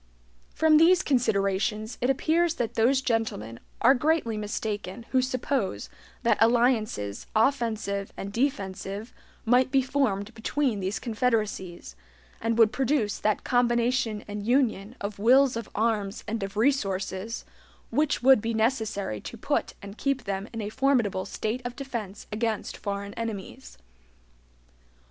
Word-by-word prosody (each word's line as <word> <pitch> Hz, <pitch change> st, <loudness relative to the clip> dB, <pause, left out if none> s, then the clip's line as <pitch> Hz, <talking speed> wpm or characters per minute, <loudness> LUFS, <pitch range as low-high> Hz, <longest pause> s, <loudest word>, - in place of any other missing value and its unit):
From 315 Hz, -1 st, +5 dB
these 350 Hz, +3 st, +5 dB
considerations 215 Hz, -3 st, 0 dB
it 245 Hz, -, +1 dB
appears 325 Hz, +5 st, +2 dB
that 235 Hz, -2 st, -2 dB
those 255 Hz, +4 st, +3 dB
gentlemen 215 Hz, -, -2 dB, 0.2 s
are 255 Hz, +3 st, +7 dB
greatly 285 Hz, -4 st, +1 dB
mistaken 210 Hz, 0 st, -4 dB
who 260 Hz, -, +4 dB
suppose 255 Hz, -, -2 dB, 0.3 s
that -, -, +3 dB
alliances 225 Hz, -, +2 dB
offensive 220 Hz, -5 st, 0 dB
and 200 Hz, +1 st, -6 dB
defensive 205 Hz, -3 st, -2 dB, 0.3 s
might 250 Hz, +3 st, +4 dB
be 265 Hz, 0 st, +3 dB
formed 240 Hz, -6 st, 0 dB
between 230 Hz, 0 st, -1 dB
these 190 Hz, +2 st, -2 dB
confederacies, 215 Hz, -, -2 dB, 0.5 s
and 230 Hz, 0 st, 0 dB
would 225 Hz, -2 st, +6 dB
produce 260 Hz, -5 st, 0 dB
that 215 Hz, -1 st, 0 dB
combination 240 Hz, -2 st, +1 dB
and 205 Hz, 0 st, -5 dB
union 240 Hz, -4 st, +1 dB
of 200 Hz, 0 st, -5 dB
wills 255 Hz, +4 st, +5 dB
of 230 Hz, -, -5 dB
arms 210 Hz, -2 st, 0 dB
and 225 Hz, +1 st, -2 dB
of 195 Hz, +1 st, -5 dB
resources, 215 Hz, -4 st, 0 dB, 0.5 s
which 290 Hz, 0 st, +1 dB
would 265 Hz, -3 st, +7 dB
be 230 Hz, +1 st, -2 dB
necessary 220 Hz, -, -1 dB
to -, -, -8 dB
put -, -, -1 dB
and 200 Hz, +2 st, -9 dB
keep 275 Hz, -2 st, 0 dB
them 195 Hz, 0 st, -3 dB
in 225 Hz, -, -5 dB
a 205 Hz, -, -3 dB
formidable 235 Hz, -7 st, +1 dB
state 220 Hz, +4 st, -3 dB
of 245 Hz, 0 st, -5 dB
defense 230 Hz, -8 st, -6 dB
against 220 Hz, 0 st, -2 dB
foreign 200 Hz, 0 st, -4 dB
enemies. 200 Hz, -, -6 dB
225 Hz, 135 wpm, -27 LUFS, 200-255 Hz, 0.5 s, are